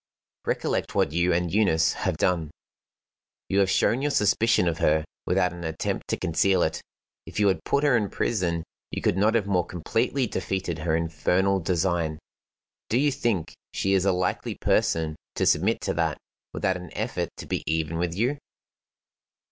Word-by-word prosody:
"Recollect -, -, -1 dB
what -, -, +2 dB
you 85 Hz, +3 st, +2 dB
and 85 Hz, 0 st, 0 dB
Eunice 95 Hz, -7 st, +3 dB
have -, -, -2 dB
done. 85 Hz, -4 st, +1 dB, 1.0 s
You 100 Hz, -, +2 dB
have 95 Hz, -1 st, +3 dB
shown 115 Hz, +6 st, +2 dB
your 145 Hz, -, +1 dB
suspicion 110 Hz, -4 st, +3 dB
of 85 Hz, -, -1 dB
her 80 Hz, 0 st, +2 dB, 0.2 s
without 90 Hz, 0 st, +2 dB
an 85 Hz, 0 st, -8 dB
attempt 80 Hz, -1 st, -3 dB
to -, -, -1 dB
conceal 90 Hz, +2 st, +2 dB
it. 80 Hz, -, -1 dB, 0.5 s
If -, -, -5 dB
you 105 Hz, -, +4 dB
had 95 Hz, -, -1 dB
put 140 Hz, -, +1 dB
her 145 Hz, -4 st, +4 dB
in 105 Hz, -4 st, +1 dB
prison 85 Hz, -7 st, -1 dB, 0.3 s
you -, -, -5 dB
could -, -, +2 dB
not 105 Hz, +4 st, +3 dB
have 110 Hz, -4 st, +2 dB
more 95 Hz, -3 st, +2 dB
completely 115 Hz, -, -1 dB
defeated 95 Hz, -6 st, -3 dB
her 80 Hz, 0 st, 0 dB
infernal 90 Hz, +4 st, +1 dB
design. 85 Hz, -2 st, 0 dB, 0.7 s
Do 115 Hz, -, +2 dB
you 145 Hz, +1 st, +3 dB
think 110 Hz, -10 st, -1 dB, 0.2 s
she 95 Hz, -, +1 dB
is 95 Hz, -2 st, +3 dB
a 100 Hz, -, +3 dB
likely 90 Hz, 0 st, -1 dB
person 80 Hz, -1 st, +1 dB, 0.2 s
to -, -, +1 dB
submit -, -, +2 dB
to -, -, -1 dB
that, -, -, 0 dB, 0.3 s
without 95 Hz, -1 st, 0 dB
an 90 Hz, -1 st, -9 dB
effort -, -, -2 dB
to -, -, -7 dB
be -, -, -2 dB
even 80 Hz, +1 st, -1 dB
with 85 Hz, -1 st, -1 dB
you?" 125 Hz, +8 st, 0 dB
90 Hz, 175 wpm, -26 LUFS, 85-100 Hz, 1.0 s, you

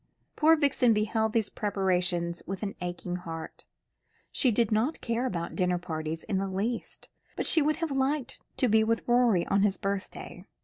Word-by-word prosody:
Poor 320 Hz, +1 st, +5 dB
Vixen 280 Hz, -6 st, +3 dB
beheld 220 Hz, +1 st, +1 dB
these 220 Hz, -2 st, 0 dB
preparations 180 Hz, -4 st, -1 dB
with 195 Hz, +3 st, -5 dB
an 200 Hz, -, -3 dB
aching 175 Hz, 0 st, -4 dB
heart. 165 Hz, -2 st, -8 dB, 0.6 s
She 260 Hz, -, +3 dB
did 230 Hz, -1 st, +1 dB
not 225 Hz, +9 st, +1 dB
care 235 Hz, +2 st, -1 dB
about 170 Hz, -6 st, -4 dB
dinner 180 Hz, -1 st, +1 dB
parties 160 Hz, -2 st, -4 dB
in 195 Hz, -3 st, -1 dB
the 195 Hz, -, -1 dB
least, 215 Hz, +5 st, -3 dB, 0.3 s
but -, -, -2 dB
she 320 Hz, -, +4 dB
would 305 Hz, +1 st, +2 dB
have 330 Hz, -3 st, -3 dB
liked 270 Hz, 0 st, -1 dB, 0.2 s
to 255 Hz, -, +2 dB
be 220 Hz, 0 st, +4 dB
with 230 Hz, +1 st, -1 dB
Roderick 240 Hz, -7 st, +3 dB
on 195 Hz, -, +4 dB
his 195 Hz, -2 st, +2 dB
birthday. 200 Hz, -1 st, -5 dB
210 Hz, 175 wpm, -28 LUFS, 180-240 Hz, 0.6 s, Poor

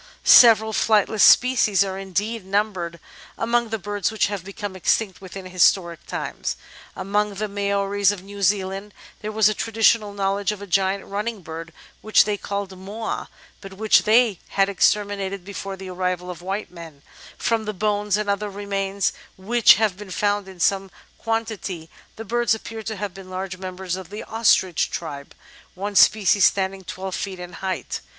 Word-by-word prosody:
Several 220 Hz, -2 st, +7 dB
flightless 215 Hz, 0 st, +2 dB
species 240 Hz, -6 st, +5 dB
are 190 Hz, -1 st, -4 dB
indeed 205 Hz, +3 st, -3 dB
numbered 190 Hz, -4 st, -2 dB, 0.4 s
among 235 Hz, 0 st, 0 dB
the 225 Hz, -, -2 dB
birds 205 Hz, 0 st, -2 dB
which 220 Hz, -, +1 dB
have 195 Hz, -4 st, -5 dB
become 200 Hz, 0 st, -7 dB
extinct 190 Hz, +1 st, 0 dB
within 190 Hz, 0 st, -9 dB
historic 180 Hz, -1 st, +2 dB
times. -, -, -4 dB, 0.4 s
Among 205 Hz, +1 st, -1 dB
the 215 Hz, +2 st, -2 dB
Maoris 200 Hz, 0 st, +1 dB
of 205 Hz, -3 st, -3 dB
New 200 Hz, +1 st, -10 dB
Zealand 195 Hz, +1 st, -1 dB, 0.3 s
there 215 Hz, -, -4 dB
was 215 Hz, -1 st, +4 dB
a 215 Hz, -, +2 dB
traditional 225 Hz, -1 st, +2 dB
knowledge 200 Hz, 0 st, -1 dB
of 210 Hz, -, -6 dB
a 200 Hz, -, -8 dB
giant 195 Hz, +1 st, 0 dB
running 210 Hz, 0 st, -4 dB
bird 160 Hz, 0 st, -8 dB, 0.3 s
which 215 Hz, -, +5 dB
they 210 Hz, 0 st, 0 dB
called 200 Hz, -1 st, -5 dB
"Moa," 205 Hz, +4 st, -5 dB, 0.3 s
but 195 Hz, -1 st, -10 dB
which 215 Hz, +2 st, +4 dB
they 225 Hz, -3 st, +3 dB, 0.2 s
had 195 Hz, 0 st, +4 dB
exterminated 200 Hz, -1 st, 0 dB
before 195 Hz, -1 st, -6 dB
the 190 Hz, -1 st, -8 dB
arrival 180 Hz, 0 st, -2 dB
of 175 Hz, -, -10 dB
white 195 Hz, +4 st, -4 dB
men; 165 Hz, -5 st, -12 dB, 0.3 s
from 225 Hz, -1 st, 0 dB
the 215 Hz, -, -2 dB
bones 210 Hz, 0 st, 0 dB
and 210 Hz, -1 st, -3 dB
other 200 Hz, +1 st, -1 dB
remains 200 Hz, -1 st, -2 dB, 0.2 s
which 225 Hz, +4 st, +5 dB
have 210 Hz, -3 st, 0 dB
been 205 Hz, -1 st, -10 dB
found 205 Hz, +1 st, 0 dB
in 190 Hz, -2 st, -12 dB
some 195 Hz, +2 st, +1 dB, 0.3 s
quantity 220 Hz, -7 st, -3 dB, 0.2 s
the 225 Hz, -, -8 dB
birds 235 Hz, +1 st, +1 dB
appear 225 Hz, 0 st, -8 dB
to 220 Hz, 0 st, -5 dB
have 200 Hz, -2 st, -5 dB
been 195 Hz, -1 st, -12 dB
large 185 Hz, 0 st, -5 dB
members 185 Hz, -1 st, -5 dB
of 185 Hz, -2 st, -9 dB
the 210 Hz, +2 st, -7 dB
Ostrich 215 Hz, -6 st, +2 dB
tribe, 145 Hz, -4 st, -7 dB, 0.4 s
one 200 Hz, +2 st, -5 dB
species 205 Hz, -1 st, +5 dB
standing 190 Hz, 0 st, 0 dB
12 190 Hz, +1 st, -6 dB
feet 190 Hz, -1 st, -4 dB
in 180 Hz, 0 st, -8 dB
height. 190 Hz, +1 st, -4 dB
200 Hz, 170 wpm, -23 LUFS, 190-210 Hz, 0.4 s, Several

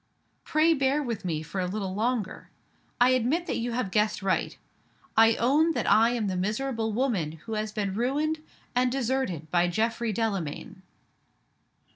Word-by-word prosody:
Pray 315 Hz, +2 st, +3 dB
bear 275 Hz, 0 st, +1 dB
with 230 Hz, -5 st, -4 dB
me 160 Hz, -4 st, -2 dB
for 185 Hz, +4 st, -4 dB
a 180 Hz, -, -1 dB
little 190 Hz, 0 st, -3 dB
longer. 220 Hz, 0 st, -2 dB, 0.5 s
I 245 Hz, +1 st, +6 dB
admit 255 Hz, +8 st, +1 dB
that -, -, -2 dB
you 235 Hz, +1 st, -2 dB
have 235 Hz, -5 st, -2 dB
guessed 210 Hz, -1 st, +1 dB
right. 190 Hz, -1 st, 0 dB, 0.6 s
I 225 Hz, 0 st, +6 dB
own 300 Hz, +7 st, +3 dB
that 245 Hz, -, -2 dB
I 225 Hz, +2 st, +5 dB
am 240 Hz, -3 st, -1 dB
the 190 Hz, -2 st, -1 dB
miserable 220 Hz, +4 st, -1 dB
woman 210 Hz, -, 0 dB
who 165 Hz, +8 st, -8 dB
has 215 Hz, 0 st, -2 dB
been 205 Hz, -3 st, -2 dB
ruined 290 Hz, +8 st, 0 dB, 0.3 s
and 250 Hz, 0 st, +2 dB
deserted 250 Hz, -, -2 dB
by 175 Hz, 0 st, +3 dB
Geoffrey 225 Hz, +4 st, 0 dB
Delamayn." 195 Hz, -6 st, -3 dB
225 Hz, 160 wpm, -27 LUFS, 195-255 Hz, 0.6 s, I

